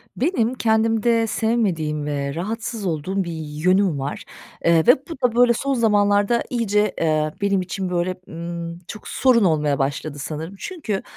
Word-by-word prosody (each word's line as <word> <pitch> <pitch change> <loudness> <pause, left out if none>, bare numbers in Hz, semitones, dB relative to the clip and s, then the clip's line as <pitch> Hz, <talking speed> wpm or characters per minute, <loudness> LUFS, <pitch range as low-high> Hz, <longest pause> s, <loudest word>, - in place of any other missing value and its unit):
Benim 255 -5 +1
kendimde 225 0 +2
sevmediğim 180 -11 0
ve 140 -1 -2
rahatsız 215 +4 -4
olduğum 185 +3 -1
bir 170 - -5
yönüm 160 +2 +1
var, 135 +2 -4 0.4
eee, 165 -1 +4
ve 245 - +9
bu - - -7
da, 245 -2 +1
böyle, 245 0 +5
son 275 +4 -1
zamanlarda 205 -1 +3
iyice, 210 -4 +1
eee, 155 -1 +1
benim 200 -1 +2
için, 185 +1 -4
böyle, 180 +1 -1
ımm, 170 0 -6
çok 210 - -9
sorun 250 -4 +3
olmaya 150 -5 +2
başladı 145 +2 -2
sanırım. 160 +6 -5
Çünkü, 260 - -4
195 Hz, 150 wpm, -22 LUFS, 160-225 Hz, 0.4 s, ve